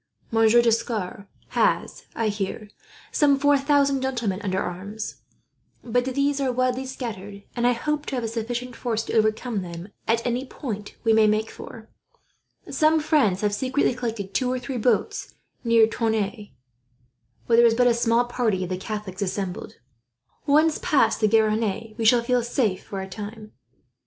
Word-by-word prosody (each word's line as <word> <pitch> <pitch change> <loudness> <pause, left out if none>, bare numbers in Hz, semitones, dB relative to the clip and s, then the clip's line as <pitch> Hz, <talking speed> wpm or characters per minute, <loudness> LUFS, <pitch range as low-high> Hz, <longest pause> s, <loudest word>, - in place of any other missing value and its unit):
Monsieur 225 +1 +5
D'Escars 220 -4 -1 0.2
has, - - 0
I 225 -2 0
hear, 210 +1 -4 0.4
some 285 -2 +4
four 285 +1 +4
thousand 280 -1 +2
gentlemen 235 -7 -2
under 190 -3 -1
arms; 200 +5 -5 0.6
but 245 +1 0
these 280 +2 0
are 265 -2 +1
widely 255 +1 0
scattered, 205 -6 -7
and 240 0 +2
I 245 - +4
hope 300 +5 -2
to 275 - -2
have 245 - -2
a - - -1
sufficient 240 +2 -4
force 225 -3 -2
to - - -6
overcome 220 0 +1
them 175 +1 -8 0.2
at 230 +1 +1
any 245 +1 0
point 215 -6 -6
we 225 -1 +4
may 220 -1 +5
make 215 +1 0
for. 225 -2 -11 0.8
Some 315 +1 +3
friends 280 - +2
have 210 -1 +1
secretly 260 +5 +1
collected 225 -5 -4
two 250 +5 +1
or 255 - 0
three 255 0 -5
boats 230 -1 0 0.3
near 230 -2 +5
Tonneins, 220 -2 -2 1.0
where 230 - +3
there 235 0 +7
is 225 - +2
but 245 +1 +3
a 245 - +5
small 235 +1 +2
part 240 -3 0
of 185 -1 -3
the 185 - -2
Catholics 205 -1 -6
assembled. 190 -1 -3 0.7
Once 305 +2 +4
past 225 -7 +2
the 215 - +5
Garonne, 220 0 +1
we 225 - 0
shall 235 +1 +5
feel 250 +1 +2
safe 230 -5 -1
for 195 -1 -5
a 190 - -6
time." 215 +2 -8
230 Hz, 165 wpm, -24 LUFS, 210-250 Hz, 1.0 s, there